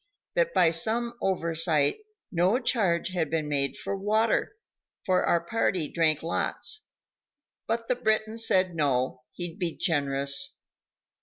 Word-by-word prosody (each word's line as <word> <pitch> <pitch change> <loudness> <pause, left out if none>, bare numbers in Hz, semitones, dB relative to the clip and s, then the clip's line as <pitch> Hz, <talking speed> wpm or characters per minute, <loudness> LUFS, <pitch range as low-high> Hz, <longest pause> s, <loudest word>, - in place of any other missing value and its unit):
that - - +1
by 165 - +4
some 225 +8 +1
oversight 165 - +1 0.3
no 180 +6 +2
charge 200 -9 +1
had 175 -5 -2
been 155 -1 -1
made 140 -2 -1
for 200 - -4
water, 215 - 0 0.5
for 185 -3 +2
our 170 - +3
party 180 -3 0
drank 160 -3 +2
lots, 430 - -1 0.8
but 230 +1 -2
the - - +2
Briton 220 -1 0
said 185 -5 +3
no, 130 -5 0
he'd 175 +1 -5
be 170 -3 -2
generous. 140 -4 +1
175 Hz, 130 wpm, -27 LUFS, 155-220 Hz, 0.8 s, by